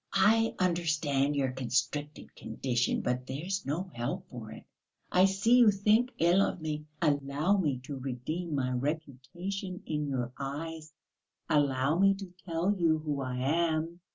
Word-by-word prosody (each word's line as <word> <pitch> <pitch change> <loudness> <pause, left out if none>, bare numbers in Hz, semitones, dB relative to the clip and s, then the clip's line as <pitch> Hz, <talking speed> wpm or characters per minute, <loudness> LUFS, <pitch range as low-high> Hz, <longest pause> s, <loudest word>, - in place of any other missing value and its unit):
"I 225 +4 +4
understand 155 -6 +1
your 135 -2 +1
constricted 130 +4 -2
condition, 125 -2 -1
but 125 +1 -2
there's 175 +8 -3
no 175 +6 -2
help 175 +11 -3
for 115 -4 -8
it. - - -10 0.5
I 185 +1 +6
see 195 +6 +4
you 235 -3 +8
think 210 +5 +3
ill 175 +4 +4
of 195 - 0
me. 155 -1 -4 0.2
Allow 145 +5 +2
me 150 -9 +1
to 140 +1 -6
redeem 145 +6 -4
my 130 -2 0
reputation 160 +8 -4
in 150 -1 -2
your 125 -3 -2
eyes, 155 +3 -5 0.6
allow 140 +1 +2
me 195 0 +5
to 195 -2 -9
tell 170 +4 +1
you 165 -4 +3
who 150 -3 -3
I 130 -1 -3
am. 165 +3 0
155 Hz, 150 wpm, -30 LUFS, 135-180 Hz, 0.6 s, you